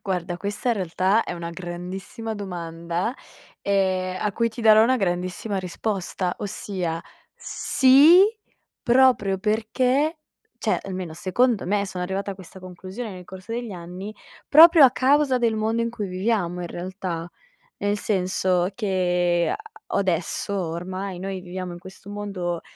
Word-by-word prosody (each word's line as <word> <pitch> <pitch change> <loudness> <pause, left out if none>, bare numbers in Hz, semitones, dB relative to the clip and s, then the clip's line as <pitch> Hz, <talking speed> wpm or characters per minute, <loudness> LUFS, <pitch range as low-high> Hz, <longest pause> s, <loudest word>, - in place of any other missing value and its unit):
Guarda, 180 -3 -3
questa 205 +7 -3
in 240 - +3
realtà 190 +3 +1
è - - -4
una 170 -1 -5
grandissima 185 +5 -6
domanda, 175 +1 -4 0.5
ehm, 185 -2 0
a 210 - 0
cui 230 +3 +1
ti 230 +2 -9
darò 220 -1 +7
una 255 +3 +3
grandissima 185 +1 -2
risposta, 185 -1 -3
ossia 185 -5 -4 0.3
sì, 285 +7 +5 0.6
proprio 240 -6 +4
perché, 250 - +1 0.4
cioè, - - 0
almeno 185 -3 -5
secondo 225 +6 +1
me 200 +1 +1
sono 180 -1 -4
arrivata 195 +2 -3
a - - -10
questa 190 0 -13
conclusione 185 +5 -7
nel 180 -1 -10
corso 190 +4 -9
degli 235 -2 -4
anni, 180 +4 -8 0.3
proprio 320 0 +9
a 260 - +7
causa 265 +1 +3
del 230 -2 +1
mondo 220 +2 0
in 230 - -1
cui 215 -3 -4
viviamo 185 -2 -1
in 175 - -4
realtà. 175 -2 -5 0.5
Nel 205 +1 0
senso 185 -2 0
che 180 -4 +1
a 440 0 -8
adesso 190 +1 -1
ormai 185 +2 -4
noi 190 0 -4
viviamo 180 0 -6
in - - -9
questo 190 +2 -13
mondo, 195 -4 -4
190 Hz, 140 wpm, -24 LUFS, 180-225 Hz, 0.6 s, proprio